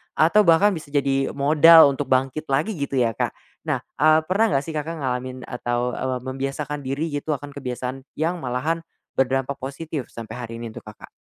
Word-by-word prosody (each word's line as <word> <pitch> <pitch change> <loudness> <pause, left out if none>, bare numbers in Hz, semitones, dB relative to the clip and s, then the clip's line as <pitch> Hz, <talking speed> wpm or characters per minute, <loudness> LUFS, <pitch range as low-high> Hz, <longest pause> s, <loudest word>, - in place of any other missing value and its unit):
atau 170 +7 +5
bahkan 170 +5 +6
bisa 155 -3 -8
jadi 135 -1 +1
modal 150 +2 +7
untuk 135 -1 -4
bangkit 135 +4 0
lagi 155 +11 +1
gitu 140 -2 -2
ya, 115 -2 +2
Kak. - - -1 0.4
Nah, - - +1 0.2
eee, 155 +2 +6
pernah 200 +5 +3
nggak 135 0 +2
sih 160 - -6
Kakak 160 +2 -3
ngalamin 130 0 -3
atau, 120 0 -2
eee, 130 -1 -2
membiasakan 135 +3 -4
diri 140 +5 -2
gitu, 145 +2 -1
akan 145 +1 -8
kebiasaan 130 -1 -5
yang 165 +4 0
malahan 135 +7 -1 0.4
berdampak 135 +1 0
positif 140 +1 -5
sampai 115 -1 -8
hari 120 -2 -6
ini 115 - -5
untuk - - -10
Kakak? 105 - -12
140 Hz, 180 wpm, -23 LUFS, 130-155 Hz, 0.4 s, modal